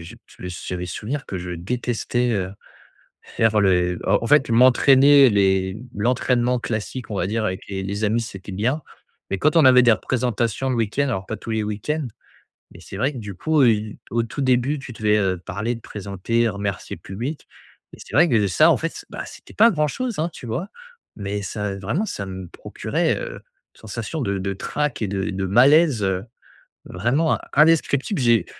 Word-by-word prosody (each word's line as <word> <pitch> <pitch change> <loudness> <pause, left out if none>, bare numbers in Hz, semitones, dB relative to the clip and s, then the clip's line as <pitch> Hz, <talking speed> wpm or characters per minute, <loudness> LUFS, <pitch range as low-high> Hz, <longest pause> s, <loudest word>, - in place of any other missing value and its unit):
j'a 85 0 -11 0.3
j'avais 90 0 -5
souvenir 115 - -4
que 95 - -5
je 90 0 -6
détestais, 120 +6 -2
heu, 95 -3 -2 0.7
faire 110 -2 +1
le 90 -2 +2
en - - +4
en - - -2
fait, 145 0 +4
m'entraîner. 135 +3 +6
Les 95 -2 +2 0.2
l'entraînement 125 +2 +1
classique, 110 0 -5
on 105 - -3
va 90 - 0
dire, 110 +3 -1
avec 95 -3 -3
les 95 -1 -4
les 100 +3 -3
amis, 115 +3 +1
c'était 100 -3 -8
bien, 120 +11 0 0.5
mais 95 - 0
quand 155 - +2
on 155 - +6
avait 125 -1 +7
des 120 -2 +6
représentations 120 +3 -1
le 125 - 0
week-end, 115 +5 0
alors 100 -7 -3
pas 110 - -4
tous - - -8
les 110 -1 0
week-ends, 125 +8 -3 0.6
mais - - -14
c'est - - -10
vrai 140 +6 +1
que 125 - -6
du 105 -3 -7
coup, 155 - +1
heu, 110 -3 +2
au 115 0 +1
tout 115 +5 -6
début, 130 +3 +2
tu 135 -2 -9
devais, 105 -1 +1
heu, 95 -3 0
parler, 110 +7 -3
te 115 - -12
présenter, 105 +4 -2
remercier 100 -2 -4
le - - -20
public 125 +11 -6 0.5
et - - -15
c'est - - -11
vrai 165 +5 +6
que 125 - +1
de 105 - +3
ça, 90 - +4
en - - +4
fait, - - -1
s - - -11
bah, - - -5
c'était - - -13
pas 230 +3 +6
grand 150 -5 +1
chose, 245 - -4
hein, 165 +2 0
tu 125 - -9
vois? 130 - -3 0.5
Mais 100 0 -4
ça, 100 0 -4
vraiment, 120 - -2
ça 100 - -4
me 95 -1 -7
procurait, - - -2
heu, - - -6
une - - -11 0.4
sensation 115 +8 -5
de 100 -4 -1
de 100 +1 -2
trac 150 +7 -3
et 105 - -1
de 95 -1 -2
et - - -3
de 95 0 -2
malaise 130 - +4 0.8
vraiment 135 - 0 0.2
indescriptible. 155 +2 +3
J'ai 115 -6 +3
115 Hz, 195 wpm, -22 LUFS, 100-130 Hz, 0.8 s, avait